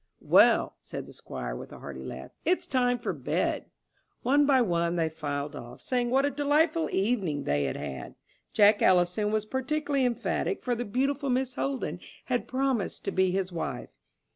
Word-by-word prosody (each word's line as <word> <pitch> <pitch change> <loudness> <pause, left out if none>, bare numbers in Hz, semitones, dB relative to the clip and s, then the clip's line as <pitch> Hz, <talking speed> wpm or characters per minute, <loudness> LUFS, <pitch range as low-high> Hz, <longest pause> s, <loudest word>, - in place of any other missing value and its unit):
"Well," - - +5
said - - -7
the - - -13
Squire, - - -6
with - - -8
a - - -9
hearty 65 -2 -8
laugh, 65 0 -7
"it's 360 +3 +1
time 245 -2 +2
for 240 - -3
bed." - - -1 0.6
One 285 +3 +4
by 270 -2 +5
one 170 -6 +1
they 165 -2 +1
filed 145 -2 -4
off, 120 +1 -9
saying 245 -2 -1
what 270 +3 +3
a 285 - +1
delightful 300 +3 +2
evening 190 - 0
they 70 0 +1
had 65 - -2
had. 65 -2 -6 0.4
Jack 205 0 +5
Ellison 180 +3 +3
was 215 -1 0
particularly 275 +3 -1
emphatic, 250 +9 -1
for 250 - 0
the 240 +1 -2
beautiful 275 +5 0
Miss 255 0 0
Holden 270 0 -2 0.3
had 245 -1 -1
promised 260 -5 -1
to - - 0
be 190 0 +2
his 185 0 -1
wife. 170 - -4
235 Hz, 175 wpm, -28 LUFS, 170-265 Hz, 0.6 s, Well